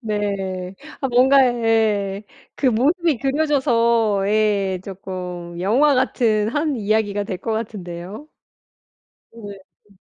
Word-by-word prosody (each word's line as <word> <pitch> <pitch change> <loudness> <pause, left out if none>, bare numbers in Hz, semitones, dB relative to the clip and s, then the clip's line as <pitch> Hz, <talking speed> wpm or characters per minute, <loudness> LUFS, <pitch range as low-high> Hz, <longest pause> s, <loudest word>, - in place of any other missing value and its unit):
네. 195 -4 -3 0.3
아 270 - 0
뭔가 265 +3 +5
예 220 -4 0 0.3
그 275 - -1
모습이 285 +5 +2
그려져서 235 -7 +1
예 205 -3 +1
쪼끔 180 -3 -7
영화 265 +10 +3
같은 225 -5 +1
한 295 +2 -1
이야기가 205 -1 0
될 190 -4 -5
것 225 +4 -3
같은데요? 205 - -6 1.1
어 230 - -12
네. 200 -1 -9 0.3
음. 195 - -23
215 Hz, 200 characters per minute, -21 LUFS, 195-250 Hz, 1.1 s, 뭔가